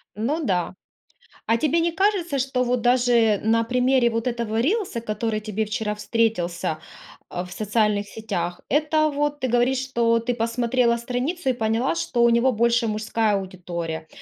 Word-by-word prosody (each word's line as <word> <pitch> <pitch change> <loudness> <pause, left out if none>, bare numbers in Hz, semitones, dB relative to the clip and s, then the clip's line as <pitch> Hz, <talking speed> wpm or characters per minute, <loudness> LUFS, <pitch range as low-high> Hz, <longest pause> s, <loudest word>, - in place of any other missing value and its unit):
Ну 280 +10 -1
да. 180 -2 -1 0.7
А 230 - +3
тебе 310 +5 +1
не 335 0 +1
кажется, 360 -6 +1
что 255 -1 0
вот 245 -1 0
даже 240 -4 +3
на 230 +1 +3
примере 250 +1 +2
вот 230 +1 -2
этого 230 -2 -1
рилса, 360 - -1
который 215 0 -2
тебе 215 0 -2
вчера 215 0 -2
встретился, 180 -8 -1 0.5
а, 175 - -4
в 180 - -13
социальных 210 0 0
сетях, 180 -6 -4
это 310 +2 +2
вот 290 0 -1
ты 260 - 0
говоришь, 245 +2 +2
что 235 -3 +1
ты 245 +2 -2
посмотрела 235 +1 +1
страницу 260 +7 -2
и - - +3
поняла, 225 -4 0
что 165 +9 0
у 235 - +6
него 235 +3 +3
больше 235 0 +2
мужская 215 0 0
аудитория. 175 -4 -5
235 Hz, 160 wpm, -23 LUFS, 215-255 Hz, 0.7 s, у